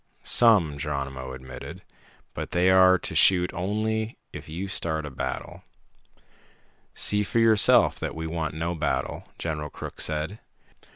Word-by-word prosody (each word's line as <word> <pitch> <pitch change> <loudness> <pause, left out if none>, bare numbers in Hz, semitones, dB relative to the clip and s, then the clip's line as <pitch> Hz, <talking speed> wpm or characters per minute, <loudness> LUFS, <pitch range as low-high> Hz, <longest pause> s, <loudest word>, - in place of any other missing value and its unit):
"Some," 95 -12 +4
Geronimo 70 -3 -4
admitted. 65 0 -9 0.5
"But - - -5
they 90 +2 +3
are 95 0 +6
to - - -5
shoot 90 -1 +4
only 110 +4 -2 0.2
if - - -9
you 90 +5 -5
start 80 -4 -2
a 75 - -7
battle." 65 - -5 1.3
"See 105 0 +2
for 110 +3 -2
yourself 110 -2 +5
that - - -4
we 80 0 -5
want 80 -2 -3
no 85 +2 -2
battle," 80 -3 -2
General 75 -2 -4
Crook - - -8
said. 80 +7 -2
85 Hz, 135 wpm, -25 LUFS, 75-100 Hz, 1.3 s, are